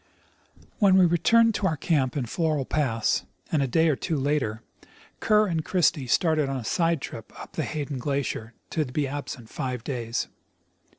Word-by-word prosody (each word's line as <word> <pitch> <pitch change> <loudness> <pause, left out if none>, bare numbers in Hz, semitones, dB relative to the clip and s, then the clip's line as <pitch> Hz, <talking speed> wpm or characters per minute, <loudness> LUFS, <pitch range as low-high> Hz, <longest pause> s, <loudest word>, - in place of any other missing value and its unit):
We 200 - +5
then 185 -1 +6
returned 225 +7 +4
to 195 - 0
our 160 - -1
camp 140 -3 +1
in 130 - -1
Floral 155 +1 0
pass, 115 -8 0 0.3
and 155 - +2
a 135 - +1
day 160 +6 +3
or 155 - +3
tAVO 160 +2 -2
later 130 -6 -1 0.6
Kerr 215 0 +4
and 165 -5 -1
Christie 155 -6 +1
started 155 +1 +2
on 135 - -2
a 120 - -6
side 165 0 +1
trip 115 - -8
up - - -9
the - - -3
Hayden 145 -3 -3
glacier, 125 -4 -3 0.2
to 160 - +1
be 140 +2 -1
absent 135 -4 -6
.five 125 -3 -3
days. 120 -3 -2
145 Hz, 175 wpm, -26 LUFS, 125-165 Hz, 0.6 s, then